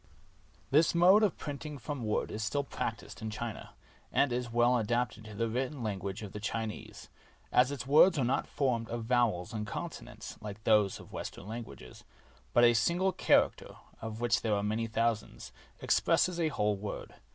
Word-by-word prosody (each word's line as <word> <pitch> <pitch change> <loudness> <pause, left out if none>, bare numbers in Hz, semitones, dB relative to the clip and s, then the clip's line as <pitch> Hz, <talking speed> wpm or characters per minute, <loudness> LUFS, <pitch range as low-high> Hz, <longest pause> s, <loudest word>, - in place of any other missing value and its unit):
This 155 +4 +4
mode 185 +5 +7
of 210 -5 +2
printing 145 0 -6
from 140 +1 -5
wood 105 -1 -1
is 110 +1 -3
still 140 +8 0
practiced 110 -8 -5
in 110 - -3
China, 110 +1 -6 0.4
and 140 -3 +2
is 120 -1 -2
well 120 +1 +4
adapted 115 0 -1
to 110 -1 -9
the 115 +3 0
written 125 +3 -3
language 100 0 -4
of 100 - -7
the 105 - -6
Chinese, 110 -1 -5 0.4
as 125 +2 +4
its 130 -4 -5
words 155 +6 +6
are 130 - +2
not 125 - 0
formed 120 -5 -1
of 120 0 -3
vowels 115 -7 +1
and 105 -1 -3
consonants, - - -7
like 105 0 -8
those 105 -3 +3
of - - -14
Western - - -6
languages, 110 - -8 0.5
but 120 - +4
a 120 0 +7
single 170 +12 +2
character, - - +2 0.3
of 110 0 -5
which 120 -1 +2
there 110 -2 +1
are 100 - -1
many 110 +2 -1
thousands, 115 -1 -2 0.3
expresses 180 -1 +2
a 165 - +2
whole 105 -8 0
word. 100 +1 -6
115 Hz, 175 wpm, -31 LUFS, 105-135 Hz, 0.5 s, mode